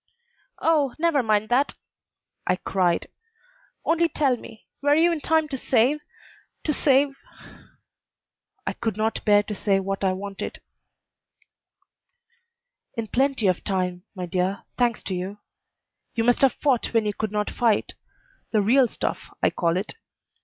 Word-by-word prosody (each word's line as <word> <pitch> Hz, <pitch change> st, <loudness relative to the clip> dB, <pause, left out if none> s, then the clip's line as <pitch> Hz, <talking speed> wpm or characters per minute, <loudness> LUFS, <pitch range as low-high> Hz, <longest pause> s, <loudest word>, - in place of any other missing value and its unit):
"Oh, 300 Hz, -5 st, +2 dB
never 320 Hz, -3 st, +2 dB
mind 215 Hz, -2 st, +1 dB
that!" 260 Hz, +4 st, +2 dB, 0.7 s
I -, -, +3 dB
cried: 180 Hz, -2 st, 0 dB, 0.8 s
"only 335 Hz, 0 st, +3 dB
tell 275 Hz, -6 st, +2 dB
me, 225 Hz, -2 st, -13 dB, 0.2 s
were 290 Hz, +1 st, +4 dB
you 335 Hz, +2 st, +4 dB
in 330 Hz, -, -1 dB
time 320 Hz, 0 st, +2 dB
to 270 Hz, -, -3 dB
save 255 Hz, +5 st, +3 dB, 0.6 s
to 300 Hz, -, +1 dB
save 275 Hz, 0 st, +3 dB, 0.8 s
" -, -, -52 dB
I -, -, -1 dB
could 225 Hz, -4 st, -3 dB
not 220 Hz, +1 st, -1 dB
bear 205 Hz, -1 st, +5 dB
to 210 Hz, -, -5 dB
say 195 Hz, -1 st, +1 dB
what 195 Hz, +1 st, -3 dB
I 190 Hz, -1 st, +3 dB
wanted. 195 Hz, +1 st, -6 dB, 2.4 s
"In 225 Hz, -2 st, -3 dB
plenty 265 Hz, -3 st, +1 dB
of 185 Hz, -2 st, +2 dB
time, 180 Hz, -2 st, -1 dB
my 180 Hz, -1 st, -4 dB
dear; 185 Hz, +3 st, -1 dB
thanks 240 Hz, -2 st, +1 dB
to 190 Hz, -, -3 dB
you. 185 Hz, +3 st, -4 dB, 0.8 s
You 230 Hz, -, +1 dB
must 245 Hz, +1 st, +3 dB
have 270 Hz, -2 st, +5 dB
fought 255 Hz, -5 st, 0 dB
when 225 Hz, -1 st, +3 dB
you 210 Hz, -, 0 dB
could 215 Hz, 0 st, -3 dB
not 210 Hz, 0 st, -1 dB
fight: 230 Hz, -4 st, +1 dB, 0.6 s
the 215 Hz, -2 st, +2 dB
real 250 Hz, +5 st, +5 dB
stuff, -, -, -4 dB
I -, -, +4 dB
call 170 Hz, 0 st, +1 dB
it. 195 Hz, -, -3 dB
225 Hz, 150 wpm, -25 LUFS, 195-275 Hz, 2.4 s, bear